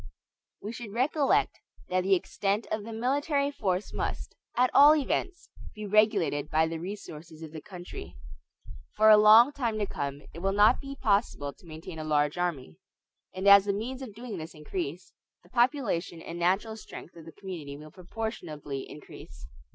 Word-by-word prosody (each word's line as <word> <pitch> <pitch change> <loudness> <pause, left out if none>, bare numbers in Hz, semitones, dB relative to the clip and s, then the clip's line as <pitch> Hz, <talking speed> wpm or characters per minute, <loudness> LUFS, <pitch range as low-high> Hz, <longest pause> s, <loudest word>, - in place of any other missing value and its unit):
We 210 - -4
should 230 -3 -8
recollect 275 +4 +1 0.3
that 185 0 +1
the 190 +1 +3
extent 200 +3 -1
of 215 -1 -2
the 225 - -8
military 280 +5 0
force 195 -7 -2
must, - - -4 0.2
at 250 +1 +3
all 295 +2 +8
events, 345 +5 -2 0.2
be 215 0 -6
regulated 200 -8 +2
by 160 0 +3
the 165 0 -4
resources 165 -4 -8
of 155 - -9
the 155 -1 -8
country. 180 - -10 0.8
For 215 +1 +6
a 215 - +9
long 220 +5 +8
time 235 -6 -2
to 210 - 0
come, 140 -5 -5
it - - -8
will 195 +2 0
not 210 +4 +5
be 275 0 -7
possible 200 - 0
to 175 - -20
maintain 160 +1 -9
a - - -4
large 150 -1 +1
army; 145 - -3 0.6
and 190 +2 -2
as 200 0 +9
the 200 - 0
means 250 +6 -4
of 230 -6 -8
doing 230 -5 -7
this 160 +1 -8
increase, 160 +2 -6 0.3
the 175 - -21
population 240 - 0
and 170 +1 -8
natural 195 +6 +1
strength 175 - -11
of 165 -2 -12
the 165 - -10
community 160 -7 -8
will 155 +1 -12
proportionably 170 - -6
increase. 85 - -12
195 Hz, 175 wpm, -28 LUFS, 160-225 Hz, 0.8 s, a